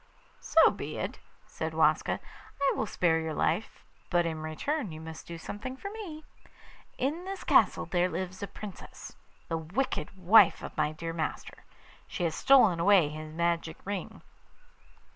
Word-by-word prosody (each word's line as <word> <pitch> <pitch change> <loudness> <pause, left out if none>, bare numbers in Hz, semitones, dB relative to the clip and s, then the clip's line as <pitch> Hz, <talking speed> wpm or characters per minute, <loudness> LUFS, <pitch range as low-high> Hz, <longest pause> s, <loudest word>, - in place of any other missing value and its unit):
'So - - +5
be - - -6
it,' - - -4 0.3
said - - -5
Waska. - - +2 0.4
'I 280 -1 +3
will 220 - -1
spare 165 -4 +2
your 160 -1 -3
life; 220 - -1 0.2
but 175 -1 +2
in 160 -1 -3
return 205 - -2
you 155 - -8
must 160 0 -9
do 170 - -6
something 225 +10 -6
for 400 +8 -6
me. 340 -9 -8 0.7
In 305 +8 -2
this 390 0 -6
castle - - +4
there 180 0 +1
lives 185 +2 -5
a 200 - -3
Princess, 200 -3 -10 0.3
the 165 - -1
wicked 190 +5 -3
wife 190 +5 +6
of - - -7
my 150 - +1
dear 165 +1 -5
master. 160 -1 -5 0.4
She - - -4
has 165 -2 +1
stolen 225 -7 +5
away 180 -3 +5
his 155 +1 -7
magic 165 0 -1
ring. 200 -1 -5
180 Hz, 160 wpm, -29 LUFS, 160-240 Hz, 0.7 s, wife